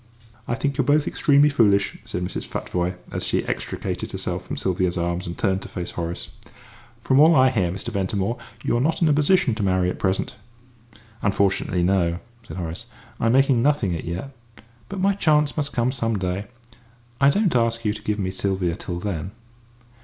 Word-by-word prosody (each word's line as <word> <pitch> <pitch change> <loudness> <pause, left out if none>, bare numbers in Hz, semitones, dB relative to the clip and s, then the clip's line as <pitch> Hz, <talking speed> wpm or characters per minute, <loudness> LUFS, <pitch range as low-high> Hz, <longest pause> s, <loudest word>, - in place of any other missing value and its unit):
"I 120 - 0
think 140 +1 -2
you're - - +4
both 145 +3 +3
extremely 145 0 +4
foolish," 105 -8 +3
said 90 - -3
Mrs. 90 - -4
Futvoye, 90 0 -2 0.2
as - - -3
she - - 0
extricated - - -4
herself - - -3
from - - -4
Sylvia's 90 -1 0
arms 85 +1 -2
and 85 - -6
turned 95 -2 +1
to - - -8
face 90 -1 -5
Horace. 85 0 -4 0.7
"From 130 +3 +2
all 160 +2 +7
I 130 -1 +5
hear, 95 -8 +1
Mr. 100 +6 -4
Ventimore, 100 +1 -1 0.2
you're 120 - +1
not 160 +5 +1
in - - +5
a 150 - +4
position 150 -2 +3
to 110 - -3
marry 95 -2 +2
at - - -8
present." 95 +2 -1 0.8
"Unfortunately, 100 -2 +1
no" 85 -2 +2 0.3
said - - -7
Horace; 85 -2 -5 0.3
"I'm 115 +1 +2
making 135 -2 +4
nothing 125 -10 +2
as 80 - -5
yet. 90 +11 -5 0.6
But 195 - -5
my 200 +1 +3
chance 150 -6 +2
must 145 -2 -2
come 120 +1 +1
some 115 -4 -1
day. 95 +2 -2 0.7
I 140 - +7
don't 190 +1 +2
ask 115 -1 +1
you 105 - +2
to 110 - -8
give 105 0 -1
me 95 -2 -2
Sylvia 95 -3 -1
till 85 -1 -5
then." 95 -2 -3
105 Hz, 185 wpm, -23 LUFS, 90-135 Hz, 0.8 s, all